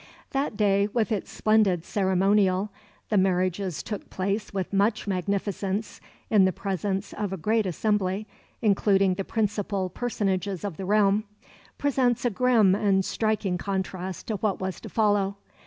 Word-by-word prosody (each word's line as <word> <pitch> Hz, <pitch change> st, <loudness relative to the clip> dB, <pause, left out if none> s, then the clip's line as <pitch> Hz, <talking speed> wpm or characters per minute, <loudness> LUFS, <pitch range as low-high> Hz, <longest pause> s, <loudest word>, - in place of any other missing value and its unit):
That 270 Hz, -5 st, -1 dB
day, 200 Hz, -1 st, +3 dB
with 230 Hz, -1 st, +1 dB
its 210 Hz, -4 st, -2 dB
splendid 210 Hz, -6 st, +2 dB
ceremonial 195 Hz, 0 st, +2 dB, 0.4 s
the 210 Hz, -, +3 dB
marriages 185 Hz, -1 st, 0 dB
took 210 Hz, -3 st, -6 dB
place 200 Hz, +3 st, -2 dB
with 190 Hz, -1 st, -3 dB
much 205 Hz, +3 st, +2 dB
magnificence 200 Hz, +2 st, -2 dB, 0.3 s
in 205 Hz, -4 st, +6 dB
the 185 Hz, -, +3 dB
presence 195 Hz, +1 st, -3 dB
of 205 Hz, -2 st, -3 dB
a 190 Hz, -, -3 dB
great 215 Hz, +4 st, +1 dB
assembly, 200 Hz, +2 st, 0 dB, 0.4 s
including 195 Hz, -2 st, +3 dB
the 195 Hz, +2 st, -3 dB
principal 200 Hz, -3 st, -1 dB
personages 195 Hz, -5 st, -2 dB
of 200 Hz, -6 st, -4 dB
the 190 Hz, -, -5 dB
realm 205 Hz, +1 st, +3 dB, 0.5 s
presents 255 Hz, -4 st, +1 dB
a 245 Hz, -, +2 dB
grim 225 Hz, -3 st, +4 dB
and 195 Hz, -2 st, +2 dB
striking 215 Hz, -5 st, -1 dB
contrast 190 Hz, -2 st, -4 dB
to 215 Hz, -, -1 dB
what 205 Hz, -1 st, -1 dB
was 190 Hz, -1 st, -4 dB
to -, -, -8 dB
follow. 205 Hz, -2 st, +1 dB
200 Hz, 145 wpm, -26 LUFS, 190-215 Hz, 0.5 s, in